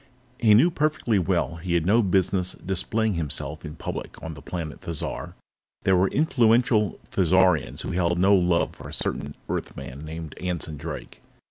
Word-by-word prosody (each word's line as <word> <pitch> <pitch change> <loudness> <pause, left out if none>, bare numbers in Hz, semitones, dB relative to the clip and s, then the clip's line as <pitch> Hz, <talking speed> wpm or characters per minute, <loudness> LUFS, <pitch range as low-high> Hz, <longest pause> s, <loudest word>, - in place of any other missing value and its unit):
He 110 -3 +6
knew 155 +11 +5
perfectly 150 - +1
well 85 -1 0
that 80 - -13
he 85 -1 +1
had 85 -2 +1
no 110 +5 +5
business 95 -2 +1
displaying 105 +4 -1
himself 75 -2 -3
in 75 -1 -7
public - - -6
on 80 +1 -5
the 75 - -11
planet 80 -1 -6
Thizar; 85 -3 -4 0.5
there 95 - +4
were 90 +2 +4
influential 115 - +3
Thizarians 90 -5 +3
who - - -4
held 85 -1 +1
no 95 +3 +5
love 90 -3 +2
for - - -10
a - - -9
certain 70 0 -3
Earthman 70 +4 -5
named 80 0 -7
Anson 85 -4 -3
Drake. - - -7
90 Hz, 165 wpm, -25 LUFS, 80-105 Hz, 0.5 s, He